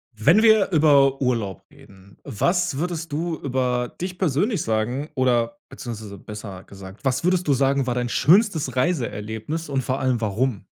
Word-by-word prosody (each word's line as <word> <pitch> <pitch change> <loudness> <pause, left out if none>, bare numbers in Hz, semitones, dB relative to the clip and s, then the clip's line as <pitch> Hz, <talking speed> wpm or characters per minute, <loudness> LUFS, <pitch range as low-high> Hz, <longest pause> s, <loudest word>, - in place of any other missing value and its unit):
Wenn 165 - +4
wir 220 -3 +4
über 140 -4 +4
Urlaub 115 -8 -1
reden, 95 0 -18
was 175 - 0
würdest 165 -1 -3
du 165 +2 -2
über 125 -2 -1
dich 180 0 -4
persönlich 185 - 0
sagen 120 +7 -2
oder 125 +4 +1
beziehungsweise 110 -6 -8
besser 100 -2 -9
gesagt, 95 +4 -13
was 130 +2 0
würdest 180 0 +1
du 145 - +4
sagen, 135 0 +1
war 120 - -1
dein 125 -1 -1
schönstes 165 - +3
Reiseerlebnis 125 0 -2
und 135 -1 0
vor 130 +1 -2
allem 130 -2 0
warum? 110 +1 -1
130 Hz, 155 wpm, -23 LUFS, 115-160 Hz, -, Wenn